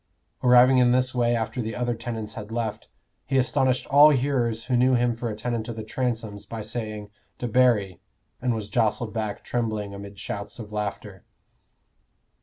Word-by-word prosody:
Arriving 125 +1 +6
in 125 -1 +5
this 130 0 +1
way 120 -1 +2
after 115 +2 -2
the 110 -1 -4
other 120 +2 -1
tenants 115 -2 -5
had 105 0 -8
left, 115 -2 -3 0.4
he 135 - 0
astonished 130 0 +2
all 145 +2 +7
hearers 125 -5 0
who 125 - 0
knew 130 +1 +4
him 120 -1 +1
for 115 0 -4
a 105 - -4
tenant 115 0 -3
of 115 - -4
the 110 - -5
Transomes 110 -3 -3
by 115 -2 -6
saying 110 -2 -5 0.3
"Debarry," 115 -7 +2 0.4
and 125 -2 +1
was 110 -2 -4
jostled 110 +1 0
back 110 -3 -3
trembling 110 -4 -2
amid 100 0 -9
shouts 100 +3 -6
of 110 -3 -9
laughter. 105 -2 -5
115 Hz, 170 wpm, -25 LUFS, 105-125 Hz, 0.4 s, all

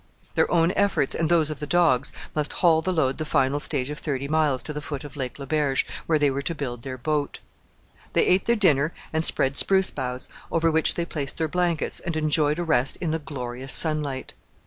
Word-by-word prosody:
Their - - +2
own 170 0 +3
efforts, 200 -9 +1
and 165 -1 0
those 160 -3 +3
of 150 - -6
the 150 - -5
dogs, 155 -6 +2 0.2
must 150 -1 -1
haul 165 -3 +3
the 185 +3 -1
load 140 -6 0
the - - -1
final 140 -1 +1
stage 145 -2 -2
of 150 - -6
thirty 140 -2 -3
miles 150 -3 +1
to 150 - -6
the 150 - -5
foot 145 -2 -6
of 145 -2 -10
Lake 130 -3 -5
Le 140 - -7
Berge, 145 -2 +1 0.2
where 160 - +3
they 145 -2 +2
were 135 +1 -2
to 165 +4 -3
build 125 -5 -5
their 130 +1 -6
boat. 145 +2 -2 0.8
They - - +3
ate 185 +1 +3
their 235 - +3
dinner 160 -7 +3 0.2
and 160 0 0
spread 135 -3 +4
spruce 190 -1 +3
boughs, 125 -2 -5 0.2
over 165 0 +2
which 160 0 +2
they 170 - -1
placed 145 -5 -5
their 160 - 0
blankets, 175 -1 -1
and 170 -2 -4
enjoyed 150 -1 +2
a 175 - -1
rest 140 -5 +1
in 165 -3 -2
the 160 - -1
glorious 130 -3 -4
sunlight. 150 -4 +1
150 Hz, 220 wpm, -24 LUFS, 135-165 Hz, 0.8 s, spread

